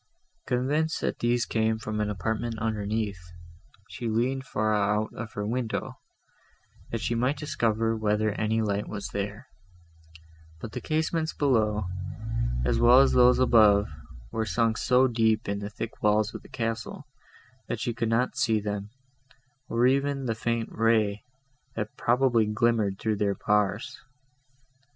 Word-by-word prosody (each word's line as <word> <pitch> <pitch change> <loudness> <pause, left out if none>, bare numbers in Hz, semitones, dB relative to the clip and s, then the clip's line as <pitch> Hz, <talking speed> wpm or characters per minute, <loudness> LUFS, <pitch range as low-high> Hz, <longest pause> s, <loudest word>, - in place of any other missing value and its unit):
Convinced 145 +6 0
that - - -2
these 120 0 +1
came 110 0 0
from 110 -1 -4
an 105 0 0
apartment 110 +4 -2
underneath, 105 -3 -2 0.7
she 120 - -6
leaned 130 +4 0
far 110 +1 0
out 105 +1 +1
of 110 -1 -7
her 105 - -3
window, 115 +1 -3 0.9
that 115 - -3
she - - -1
might 125 +5 0
discover 115 -6 0
whether 110 0 +1
any 110 +2 0
light 100 -1 -1
was 105 0 -5
there; 105 +5 -5 1.1
but 110 - -7
the 125 - -5
casements 160 +1 -1
below, 110 -7 +1 0.8
as - - +1
well 120 +2 +7
as 135 - +5
those 125 0 +5
above, 105 -5 +5 0.4
were 110 - -1
sunk 110 +3 +1
so 130 +1 +4
deep 110 -2 +1
in 100 0 -2
the 100 0 -5
thick 115 +1 -7
walls 105 +1 +2
of - - -7
the - - -16
castle, 115 -1 -4 0.6
that - - -3
she 120 - -2
could 115 0 -2
not 115 +3 +1
see 110 -1 +2
them, 105 0 -4 0.8
or 115 +1 +2
even 135 +1 +1
the 115 - 0
faint 115 0 -2
ray, 110 -2 +1 0.5
that 110 -1 -4
probably 120 -2 +2
glimmered 105 -2 +1
through 110 0 -1
their 100 -1 0
bars. 105 +4 0
110 Hz, 145 wpm, -27 LUFS, 105-120 Hz, 1.1 s, well